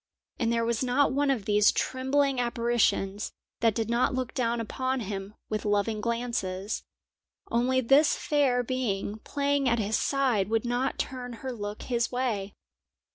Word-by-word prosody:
And 230 -3 +1
there 230 0 +1
was 235 +1 0
not 255 +2 +2
one 285 +1 +2
of 245 -8 0
these 210 0 +5
trembling 265 +1 +1
apparitions 235 -4 0 0.3
that 225 -2 +3
did 225 -2 -1
not 235 +2 +1
look 255 -2 -3
down 235 -1 0
upon 255 +3 -2
him 200 0 -5
with 215 -1 -2
loving 210 +1 0
glances; 225 -4 -2 0.7
only 255 +3 +2
this 275 +5 +5
fair 270 -5 +2
being 220 -4 -2
playing 280 +1 0
at 235 - +2
his 215 0 0
side 250 -8 +1
would 225 +1 +1
not 245 +2 0
turn 250 -2 -4
her 260 - -2
look 205 -2 -6
his 235 -2 0
way. 225 -6 -2
235 Hz, 155 wpm, -28 LUFS, 215-260 Hz, 0.7 s, these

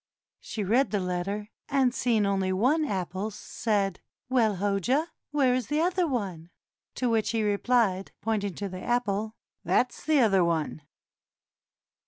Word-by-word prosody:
She 215 - -5
read 240 +8 +3
the 205 - 0
letter, 190 +4 -3 0.2
and 270 -3 +3
seeing 230 -5 +2
only 195 -1 +1
one 260 +12 +2
apple, 190 - -2
said, 205 -2 -2 0.3
"Well, 230 -5 +3
Hoja, 200 +6 +1
and 325 - -9 0.2
where 275 -4 +3
is 250 -3 -1
the 295 +2 0
other 355 0 +1
one?" 190 - -3 0.5
To 255 - 0
which 225 -2 +1
he 225 -1 0
replied, 205 -2 +1
pointing 205 -4 -1
to 200 - -4
the 185 -1 -7
apple, 220 -3 -1 0.3
"That's 245 -1 +1
the 310 0 +3
other 195 -7 +4
one." 160 -2 -1
215 Hz, 150 wpm, -27 LUFS, 195-250 Hz, 0.5 s, other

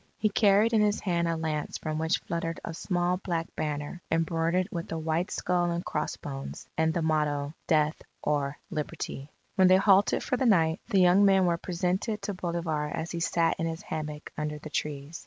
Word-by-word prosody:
He 215 - +2
carried 210 +2 +4
in 220 - +5
his 210 0 +2
hand 170 -3 0
a 165 -1 0
lance 155 -2 -2
from 155 -1 -3
which 160 +2 +2
fluttered 165 0 -3
a 170 - -5
small 175 +1 0
black 170 -3 -2
banner, 150 +2 -3
embroidered 165 +2 +1
with 170 -2 -5
a 165 - -2
white 160 +4 -1
skull 175 -1 0
and 170 0 -2
cross 150 - -2
bones, 135 -1 -7
and 160 0 +2
the 165 0 -1
motto: 150 -2 0
Death 155 -1 +2 0.2
or 145 -1 0
Liberty 150 -3 -4 0.3
When 190 -1 +6
they 185 +1 +7
halted 195 0 +4
for 255 - 0
the 260 - +2
night, 165 -5 +3
the 195 - +3
young 180 +3 +6
men 195 -2 +5
were 170 -1 +2
presented 185 +5 -1
to 205 - -2
Bolivar 170 -4 -2
as 160 +2 -4
he 170 - -3
sat 165 0 +1
in 165 - 0
his 165 0 -5
hammock 150 -1 -5
under 150 0 -3
the 155 0 -9
trees. 150 +2 -3
165 Hz, 195 wpm, -28 LUFS, 155-180 Hz, 0.3 s, they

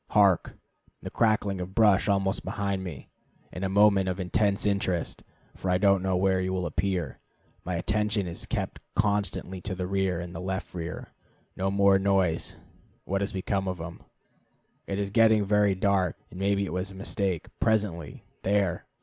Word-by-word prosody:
Hark! 100 -5 +3 0.5
the - - -6
crackling 105 -4 +1
of 90 +2 -7
brush 105 -3 +4
almost 95 -1 +1
behind 100 -2 -2
me. 80 -9 -8 0.4
It - - -7
is - - 0
a - - -4
moment 100 -1 +4
of 90 +1 -3
intense 100 +3 +1
interest, 100 -4 0 0.3
for 95 - -4
I 90 - +3
don't 100 0 +4
know 95 -1 +1
where 95 0 +2
he 95 0 -1
will 95 -1 -1
appear. 90 -7 -2 0.4
My 90 - -3
attention 105 +3 0
is 85 -1 -5
kept - - -3 0.2
constantly 100 -3 0
to 95 0 -4
the 90 0 -3
rear 95 -2 0
and 85 0 -6
left 95 +1 -4
rear. 85 -2 -5 0.5
No 95 +1 0
more 100 0 +4
noise. 95 -4 +1 0.5
What 100 +1 -1
has 100 - -1
become 95 0 -1
of 90 -2 -3
him? 80 +1 -7 0.9
It 100 - -2
is 100 -1 -2
getting 110 -1 +5
very 105 -1 +3
dark, 95 -2 +1
and 90 - -9
maybe 100 0 +1
it 85 - -5
was 90 +2 -2
a 95 - -10
mistake. 95 -3 -2
Presently, 100 -8 0 0.2
there! 95 -3 0
95 Hz, 175 wpm, -27 LUFS, 90-100 Hz, 0.9 s, getting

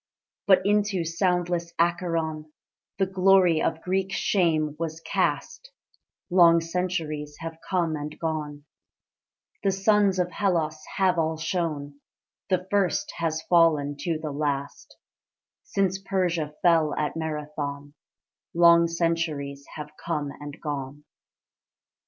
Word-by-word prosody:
But 190 -1 +5
into 205 -3 +1
soundless 175 0 0
Acheron 165 -3 -1 0.5
The 195 - +2
glory 185 -3 +4
of 160 - -1
Greek 190 +1 -1
shame 160 -7 +1
was 165 -1 -3
cast: 480 - -2 0.6
Long 170 -2 +6
centuries 165 -4 -3
have 165 0 -6
come 170 -4 +1
and 150 0 -6
gone, 150 -3 -4 1.0
The - - +2
suns 195 0 +3
of 180 -1 0
Hellas 160 -6 -1
have 185 -3 +3
all 160 0 0
shone, 155 -4 -3 0.5
The 185 -1 +1
first 200 -1 +1
has 160 -1 -1
fallen 155 -5 +3
to 165 +1 -2
the 155 -1 -5
last: 140 -1 -3 0.6
Since 190 -1 -1
Persia 175 -6 -1
fell 165 -3 +4
at 150 -1 -2
Marathon, 150 -2 -4 0.6
Long 170 0 +6
centuries 165 -5 -2
have 150 -1 -7
come 150 -4 -2
and 145 +1 -9
gone. 145 -1 -5
165 Hz, 115 wpm, -26 LUFS, 150-180 Hz, 1.0 s, Long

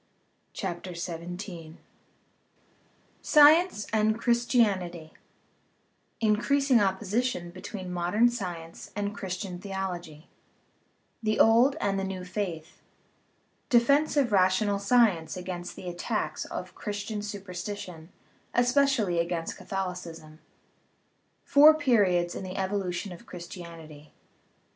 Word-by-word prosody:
CHAPTER 180 -1 -5
XVII 170 -1 -7 1.4
SCIENCE 305 - +5
AND 220 0 +2
CHRISTIANITY 210 -9 +1 1.1
Increasing 240 +4 +3
Opposition 200 0 -1
between 185 +1 -7
Modern 180 +7 +3
Science 175 -8 -5
and 205 0 -2
Christian 185 -2 -5
Theology 180 -5 -6 0.9
The 215 -1 0
Old 235 +5 +5
and 195 -6 0
the - - -2
New 190 -1 -5
Faith 180 -4 -5 0.9
Defence 280 +5 +3
of 265 -5 +2
Rational 200 +1 +3
Science 200 -7 +2
against 180 -1 -6
the 185 - -9
Attacks 175 0 -3
of - - -7
Christian 205 0 -4
Superstition, 185 -4 -7 0.5
espe 245 +3 +4
cially 210 -11 +1
against 170 -1 -3
Catholicism 175 -5 -6 1.0
Four 300 +2 +7
Periods 200 - +2
in - - -6
the 185 0 -6
Evolution 190 -1 -2
of 175 - -12
Christianity: 170 -4 -10
I. - - -27
190 Hz, 100 wpm, -28 LUFS, 175-220 Hz, 1.4 s, Four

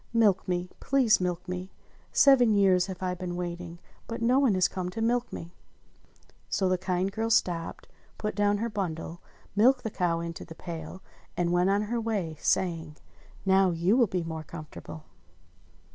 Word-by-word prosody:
Milk 210 -5 +3
me! 180 0 -2
Please 260 -8 +3
milk 180 0 -2
me! 180 +1 -4 0.4
Seven 250 -6 +6
years 190 -2 +4
have 190 -1 -6
I 180 -1 0
been 180 -1 -5
waiting, 175 -1 -5 0.3
but 230 - -4
no 245 +3 +3
one 260 -8 +3
has 185 0 +4
come 185 -2 -4
to 220 - -6
milk 235 +2 +1
me 170 +1 -7 0.5
!" - - -32
So 190 - +1
the 185 -1 +1
kind 185 +1 -1
girl 225 +2 -2
stopped, 175 -7 0 0.3
put 210 0 -2
down 205 0 +2
her 230 +3 -1
bundle, 170 -4 -4 0.3
milked 250 +5 +4
the 220 - -3
cow 175 -4 0
into 170 0 -5
the 165 - -11
pail, 165 +2 -7 0.3
and 175 -1 +1
went 175 +2 +3
on 200 +1 +2
her 230 +2 -2
way, 200 -8 -2
saying: 165 -4 0 0.5
"Now 190 0 +5
you 175 +5 +2
will 245 -3 +4
be 180 -2 -2
more 160 -1 -5
comfortable." 155 0 -9
185 Hz, 175 wpm, -28 LUFS, 175-210 Hz, 0.5 s, Seven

